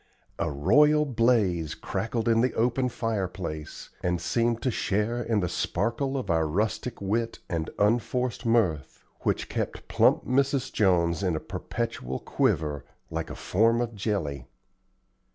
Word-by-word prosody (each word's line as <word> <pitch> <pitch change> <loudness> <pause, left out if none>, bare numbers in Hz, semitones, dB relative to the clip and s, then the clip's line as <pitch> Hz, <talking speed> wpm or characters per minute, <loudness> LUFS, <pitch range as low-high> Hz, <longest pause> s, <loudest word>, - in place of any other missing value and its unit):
A - - 0
royal 150 - +4
blaze 110 - +2
crackled 115 +4 -3
in 115 0 +4
the 125 - +1
open 125 +3 +1
fireplace, 95 -9 -4
and 90 -1 0
seemed 115 +6 +1
to 130 - +1
share 110 +3 0
in 115 -3 0
the 90 - 0
sparkle 120 - -1
of 105 -9 -2
our 80 -1 +2
rustic 110 +7 -1
wit 115 +4 -1
and 80 -2 -2
unforced 120 +4 +1
mirth, 110 - +1 0.2
which - - -1
kept - - -4
plump - - +3
Mrs. 135 0 +1
Jones 85 -4 +2
in 90 -4 +1
a - - -1
perpetual 115 - -4
quiver, 75 -2 0 0.3
like - - -3
a - - -6
form 115 +5 +2
of 120 -1 -2
jelly. 95 - -2
110 Hz, 140 wpm, -27 LUFS, 85-120 Hz, 0.3 s, royal